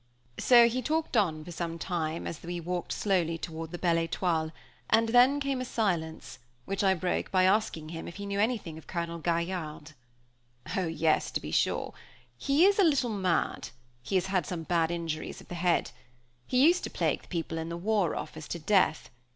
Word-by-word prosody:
So 240 -2 +7
he 250 +2 -1
talked 310 +2 -1
on, 160 -8 +1
for 175 0 -5
a 165 - -7
time, 165 -2 -3
as 165 - -5
we 175 0 -4
walked 175 +1 -3
slowly 175 -5 +1
toward 165 0 -6
the 175 - -6
Belle 170 -2 +2
Étoile, 165 -1 0 0.4
and 225 0 +4
then 250 +4 +5
came 275 -2 -1
a - - -1
silence, 160 - -2 0.3
which 195 0 -2
I 190 -1 +4
broke 180 +1 -1
by 185 -1 +3
asking 185 -5 +1
him 165 0 -6
if 170 - -8
he 200 - -6
knew 200 0 -2
anything 210 -8 -1
of - - -18
Colonel 170 -1 -3
Gaillarde. 170 -3 -2 0.8
"Oh! 185 -3 0
yes, 160 -1 +1
to - - -2
be - - -7
sure. - - 0 0.4
He 285 +5 +3
is 400 +1 +4
a - - +7
little 280 -8 +2
mad; 185 -4 0 0.3
he 135 +10 -3
has 185 - +2
had 185 -5 0
some 170 -3 -4
bad 165 -1 +1
injuries 165 -2 -4
of - - -16
the - - -6
head. 175 -4 +1 0.6
He 255 +2 +4
used 350 +3 +4
to - - -5
plague - - 0
the - - -19
people 165 -2 -3
in 160 +1 -4
the 170 - -4
War 200 -2 +1
Office 155 -1 -6
to - - -4
death. 170 -1 +2
175 Hz, 200 wpm, -29 LUFS, 165-210 Hz, 0.8 s, So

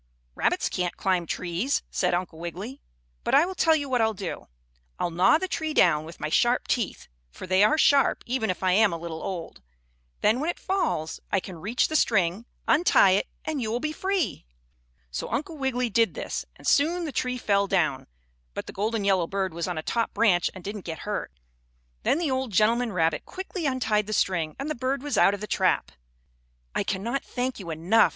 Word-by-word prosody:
"Rabbits - - +1
can't 180 -1 -2
climb 185 -3 0
trees," 180 - -1
said 180 -1 +1
Uncle 175 -2 -4
Wiggily. 185 +10 -6 0.4
"But - - +2
I 315 - +6
will 375 - -4
tell 325 -3 +4
you 290 -2 -2
what 250 -3 +1
I'll 220 -1 +2
do. 185 -2 -6 0.5
I'll 175 - -1
gnaw 180 - +5
the 375 - -3
tree 315 -3 -3
down 155 -3 +4
with 165 +1 -11
my 155 - -2
sharp 240 +9 +2
teeth, 235 -6 -2 0.2
for 60 - -9
they 185 +2 +4
are 215 +9 +4
sharp, 285 -2 +4
even 240 -4 -1
if 185 - -2
I 185 - +3
am 210 +1 +5
a 170 - -3
little 165 -1 -6
old. 175 - -6 0.6
Then, 220 +4 +3
when 310 +4 -1
it - - -2
falls, 360 - -1
I 195 - +3
can 180 -3 -9
reach 220 +7 +1
the 315 - -4
string, 190 - +2 0.2
untie 295 - +5
it, 195 - +2 0.2
and 310 -4 -2
you 220 - -2
will 235 +2 -1
be 305 +3 -2
free." 375 - -2 0.6
So 65 - -4
Uncle 315 +3 -3
Wiggily 250 -3 0
did 230 +1 +2
this, - - -4
and - - -16
soon 335 +5 +3
the 305 - -4
tree 250 -1 -1
fell 200 -4 +1
down, 155 -8 0 0.5
but - - -4
the - - -9
golden 215 +2 -1
yellow 190 -4 +2
bird 190 -2 -2
was 170 +1 -3
on 180 -2 -3
a 155 - -3
top 230 +5 -1
branch 200 -5 +3
and 185 - -9
didn't 205 +2 -5
get 160 -2 -4
hurt. 210 - -3 0.7
Then - - +2
the 330 -5 0
old 260 -2 -1
gentleman 230 +4 +3
rabbit 165 -4 +1
quickly 370 -3 -4
untied 220 -6 +1
the 215 - -3
string 170 -7 0
and 275 - -4
the 305 - -1
bird 265 +1 -2
was 290 -2 -2
out 200 - +5
of 200 - -11
the - - -3
trap. - - +1 0.8
"I - - 0
cannot 235 +8 -2
thank 250 -1 -3
you 180 -4 -7
enough!" 170 +8 +3
215 Hz, 210 wpm, -26 LUFS, 180-265 Hz, 0.8 s, I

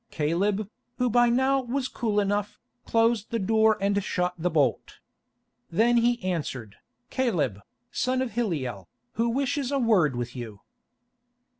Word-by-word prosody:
Caleb, 190 +7 0 0.3
who 250 -1 +1
by 240 +1 +4
now 265 +3 +2
was 255 +1 -2
cool 215 -5 -1
enough, 205 0 -1 0.3
closed 230 -2 +2
the 230 - -1
door 220 +1 +3
and 200 0 +1
shot 180 -2 -1
the 175 +1 -1
bolt. 145 -7 0 0.7
Then 230 +7 +3
he 240 +1 +2
answered, 140 - -3 0.3
"Caleb, 170 - 0
the - - -17 0.3
son 255 0 0
of 250 - -5
Hilliel, 145 - -3 0.3
who 230 +1 0
wishes 275 +2 -1
a 280 - +1
word 200 - +3
with 120 +1 -4
you." 110 -5 -8
210 Hz, 145 wpm, -26 LUFS, 165-240 Hz, 0.7 s, by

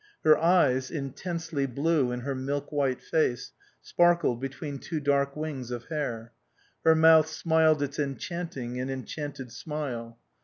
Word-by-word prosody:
Her 155 -1 +7
eyes, 155 -7 +3
intensely 160 0 -3
blue 140 0 +1
in 125 0 -3
her 135 +2 -3
milk 140 +2 -3
white 140 -4 0
face, 125 -7 0 0.3
sparkled 170 -8 +2
between 135 +1 -5
two 160 +2 -4
dark 140 -1 +1
wings 150 -5 -5
of 120 -1 -5
hair. 120 -7 -4 0.5
Her 160 0 +6
mouth 160 -1 +6
smiled 160 -1 +2
its 145 +1 -4
enchanting 135 -2 -4
and 130 +1 -3
enchanted 135 -1 -6
smile. 120 -5 -5
140 Hz, 140 wpm, -28 LUFS, 130-160 Hz, 0.5 s, Her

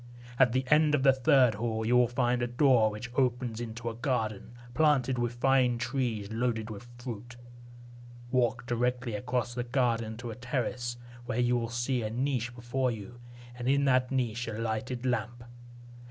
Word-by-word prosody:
At 125 - +6
the 130 +1 +1
end 150 0 +5
of 130 - 0
the 135 -1 +6
third 130 -3 +4
hall, 110 +1 -2
you 120 +2 +3
will 125 -1 +5
find 125 0 0
a 120 - 0
door 120 -3 +4
which 115 +3 -7
opens 125 -3 0
into 115 0 -6
a 115 - -2
garden, 115 -3 -2 0.2
planted 135 -4 +2
with 120 0 -1
fine 130 -1 +3
trees 120 -4 -2
loaded 115 -1 -1
with 105 +3 -9
fruit. 120 0 -7 1.0
Walk 125 -1 +1
directly 120 0 -1
across 125 +2 -2
the 120 0 -2
garden 120 -3 0
to 120 0 -6
a - - -7
terrace, 120 -1 -3 0.3
where 120 - -2
you 125 0 +2
will 115 -1 -1
see 120 +2 -1
a 110 - -2
niche 125 0 -2
before 125 +2 -1
you, 120 +1 -7 0.4
and 125 +1 -3
in 140 +1 +3
that 130 -2 +3
niche 120 -3 -1
a 110 - -4
lighted 115 +3 -3
lamp. 120 -1 -2
120 Hz, 175 wpm, -29 LUFS, 115-130 Hz, 1.0 s, At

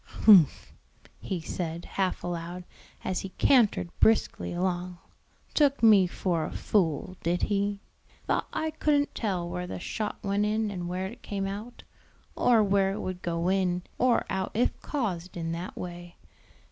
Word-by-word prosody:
"Humph," 190 -9 +6 0.5
he 185 - -3
said, 170 0 -4
half 190 -2 -2
aloud, 175 +1 -4 0.4
as 185 - -1
he 195 - -5
cantered 225 -9 +3
briskly 220 0 +2
along, 180 0 -2 0.6
"took 280 -4 +3
me 205 -5 +7
for 175 -2 -1
a - - -6
fool, 180 -2 0
did 175 +2 0
he? 200 0 0 0.4
thought - - 0
I 315 0 -2
couldn't 295 -2 +1
tell 185 -6 -2
where 180 +1 -4
the - - -5
shot 210 +4 -3
went 200 +1 +1
in 215 0 0
and 175 -3 -4
where 185 +1 -2
it 235 +6 -8
came 195 -1 -3
out, 210 +5 -6 0.5
or 230 -3 +4
where 195 -1 +2
it 210 - -5
would 185 -2 -5
go 170 0 -1
in 180 -2 +1 0.2
or 250 -1 +3
out 190 -1 -2
if 240 - +2
caused 185 - -3
in 165 -1 -3
that 170 +2 -5
way. 175 -1 -7
190 Hz, 160 wpm, -28 LUFS, 175-210 Hz, 0.6 s, me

